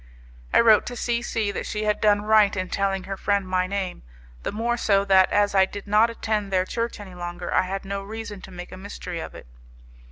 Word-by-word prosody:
I - - +5
wrote 220 -2 +5
to 245 - -5
C 235 0 -1
C 225 -3 -1
that - - -4
she 210 0 -3
had 210 -1 0
done 205 -1 +3
right 215 -2 +4
in 185 0 -2
telling 195 -1 -1
her 195 - -5
friend 200 0 0
my 185 0 +1
name, 195 -2 -3 0.4
the - - -3
more 235 +3 -1
so 200 -4 +2
that, 190 -1 +5
as 205 -1 +2
I 190 -1 +5
did 205 +1 -8
not 215 +3 +4
attend 215 -3 -2
their 185 -1 +2
church 230 +3 -3
any 195 -3 -10
longer, 175 0 -5
I - - +4
had 195 +1 -4
no 200 0 -3
reason 210 0 -7
to - - -11
make 175 -1 -9
a 185 - -8
mystery 185 -3 -7
of - - -7
it. - - -11
200 Hz, 230 wpm, -24 LUFS, 190-215 Hz, 0.4 s, I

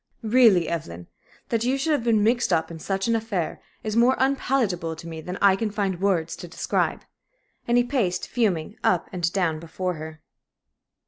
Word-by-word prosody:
Really, 220 -6 +5
Evelyn, 90 - -5 0.4
that 230 -1 0
you 255 +3 +1
should 315 +4 0
have 290 -6 +1
been 225 -3 +3
mixed 235 +1 +2
up 165 -1 +1
in 165 - -8
such 195 +4 -2
an 230 - +2
affair 220 -7 -2 0.2
is 215 -1 -3
more 240 +3 +5
unpalatable 245 -11 0
to 165 - -10
me 160 -1 -6
than 180 +4 -6
I 195 -1 +6
can 215 +2 -2
find 200 -3 -2
words 180 -5 +1
to 175 - -8
describe." 170 - -1 0.6
And 240 0 +3
he 245 - +5
paced, 240 -9 -1
fuming, 205 -6 -1
up 175 -2 +1
and 170 -2 0
down 170 -5 0
before 180 +3 -3
her. 155 0 -9
195 Hz, 185 wpm, -24 LUFS, 170-230 Hz, 0.6 s, I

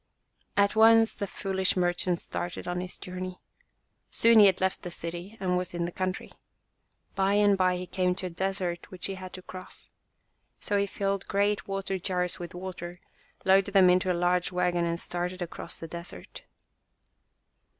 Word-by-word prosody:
At 200 +1 +4
once 225 0 +6
the 200 - -4
foolish 190 -1 0
merchant 175 0 +1
started 175 +1 -5
on 180 0 -2
his 180 0 -6
journey. 185 -1 -6 0.7
Soon 230 -1 +5
he 205 - +9
had 190 -1 +2
left 190 0 0
the 175 - -6
city 175 +5 -5
and 180 -2 0
was 180 -1 -2
in 170 0 -1
the 175 - -4
country. 185 +1 -3 0.8
By 195 +1 +2
and 205 -1 +5
by 185 -1 +2
he 180 - -5
came 180 0 0
to 185 - -4
a - - -2
desert 180 -1 -1
which 185 -2 -6
he 195 - -1
had 185 -1 -8
to 185 - -9
cross. 185 0 -9 0.7
So 205 - -2
he 200 0 +2
filled 195 0 -2
great 205 +1 +1
water 195 -1 -2
jars 180 -1 -2
with 175 0 -7
water, 175 -1 -6 0.5
loaded 195 +1 +4
them 185 -2 +7
into 185 +1 +2
a 175 - 0
large 180 +1 +1
wagon 180 -1 +1
and 170 0 -1
started 180 +1 -3
across 170 0 -7
the 165 - -7
desert. 170 +1 -8
185 Hz, 175 wpm, -28 LUFS, 180-195 Hz, 0.8 s, he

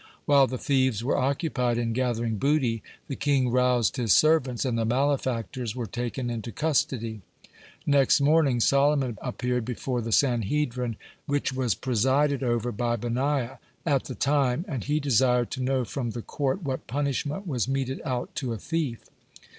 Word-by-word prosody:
While 140 -2 +5
the 130 - -4
thieves 130 -5 +1
were 130 - +1
occupied 135 -3 0
in 115 -1 -1
gathering 120 -3 -1
booty, 130 -5 +1 0.3
the 135 - -4
king 135 -4 +1
roused 125 -2 +2
his 115 -7 +3
servants, 135 - +3
and 125 -3 0
the 115 - 0
malefactors 125 -2 -1
were 125 -2 -3
taken 120 +3 -4
into 115 0 -5
custody. 115 -5 -1 0.6
Next 140 -1 +4
morning 140 -3 +3
Solomon 140 -2 +2
appeared 125 -1 -2
before 125 +1 -3
the 115 0 -4
Sanhedrin, 125 -1 +1 0.3
which 145 -2 0
was 125 -6 0
presided 130 +5 +1
over 120 -1 0
by 120 +2 -1
Benaiah 130 +3 -1 0.3
(95) 155 - +2
at 135 - +2
the 130 - -6
time, 140 - +1
and 135 - -4
he 150 +2 +1
desired 125 -3 +2
to 130 - -4
know 130 -1 0
from 120 0 -3
the 115 0 -5
court 145 +6 -2
what 135 -3 -4
punishment 145 - -2
was 130 - -1
meted 135 -1 -2
out 125 -5 -3
to 130 -5 -2
a - - -4
thief. 150 - -3
130 Hz, 160 wpm, -26 LUFS, 120-140 Hz, 0.6 s, While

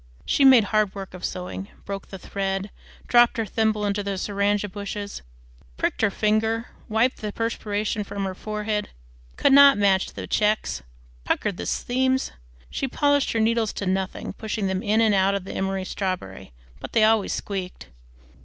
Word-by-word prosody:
She 280 - +2
made 260 -4 +8
hard 210 -1 +1
work 195 -2 -7
of 185 -1 -10
sewing, 180 +2 -4 0.2
broke 195 0 -5
the 195 - -8
thread, 195 +1 -3 0.4
dropped 240 0 +5
her 225 - 0
thimble 215 0 0
into 205 0 0
the 200 -1 -3
syringa 205 +1 0
bushes, 200 +1 -6 0.6
pricked - - -1
her 220 - +4
finger, 220 +3 0 0.2
wiped 225 +4 +2
the 210 -1 -4
perspiration 210 -2 -2
from 200 0 -5
her 190 - -3
forehead, 210 +1 -3 0.5
could 275 - +4
not 280 -3 +8
match 195 -2 +3
the - - -6
checks, 210 - 0 0.4
puckered 200 - -1
the - - -5
seams. 260 +1 0 0.4
She 270 - -2
polished 285 +2 +2
her 225 - +1
needles 225 -1 +1
to 200 - -4
nothing, 190 0 -2
pushing 220 -1 -3
them 190 0 -1
in 215 +2 +2
and 220 -2 +4
out 195 0 +3
of 200 - -3
the 195 - -7
emery 190 0 -2
strawberry, 185 - -4 0.3
but - - -8
they 220 - +4
always 220 -1 +3
squeaked. 185 - -5
205 Hz, 170 wpm, -24 LUFS, 195-225 Hz, 0.6 s, made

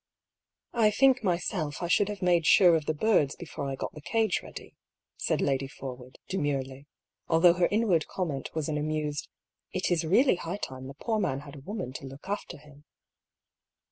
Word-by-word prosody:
"I 225 -3 +4
think 260 +3 +4
myself 175 -4 -1
I - - 0
should 200 +3 +3
have 205 -2 -5
made 175 -3 +3
sure 175 -3 +7
of 155 -2 -2
the 155 - +1
birds 150 -6 +2
before 145 -4 -6
I 135 - -3
got - - -5
the 150 - -10
cage 220 +3 +1
ready," - - -10 0.4
said - - -1
Lady 135 -1 0
Forwood, 130 -1 -9
demurely 140 -5 -2 0.4
(although 170 +1 +6
her 175 0 +2
inward 205 -7 +2
comment 155 -8 -3
was 155 -2 -1
an 150 -1 -1
amused 150 -1 -2 0.2
" - - -59
It 185 0 0
is 175 -1 +2
really 195 - +4
high 175 +3 -4
time 130 -8 -6
the 135 - -9
poor 220 +7 -1
man 140 -8 -1
had 145 -1 -11
a - - -9
woman 180 - -5
to 135 +1 -7
look 135 +6 -11
after 205 +1 -4
him 145 0 -17
160 Hz, 190 wpm, -28 LUFS, 140-190 Hz, 0.4 s, sure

